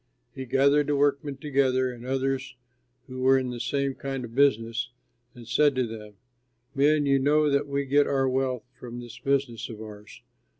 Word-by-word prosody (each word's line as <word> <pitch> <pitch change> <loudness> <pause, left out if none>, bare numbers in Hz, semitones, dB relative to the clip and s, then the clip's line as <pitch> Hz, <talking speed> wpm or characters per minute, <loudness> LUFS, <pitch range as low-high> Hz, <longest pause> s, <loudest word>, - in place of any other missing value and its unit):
He 130 - -6
gathered 140 +3 +3
the 145 - +1
workmen 140 0 0
together, 130 -2 +1
and 120 -1 -11
others 135 0 -2 0.5
who 130 -1 -7
were 135 +1 +5
in 130 -1 -2
the 120 - -6
same 140 +2 -1
kind 135 -2 -5
of 115 - -12
business, 120 -3 +1 0.5
and 120 -2 -12
said 145 +5 +3
to 130 -1 +1
them, 105 -2 -9 0.6
"Men, 145 +2 +3
you 140 -1 +3
know 150 +2 +3
that 140 +1 +1
we 140 0 -1
get 145 +2 +3
our 135 -1 +1
wealth 130 -2 -1
from 120 -1 -9
this 120 -1 -10
business 135 -3 -1
of 110 -2 -8
ours. 105 +1 -11
135 Hz, 180 wpm, -26 LUFS, 120-140 Hz, 0.6 s, were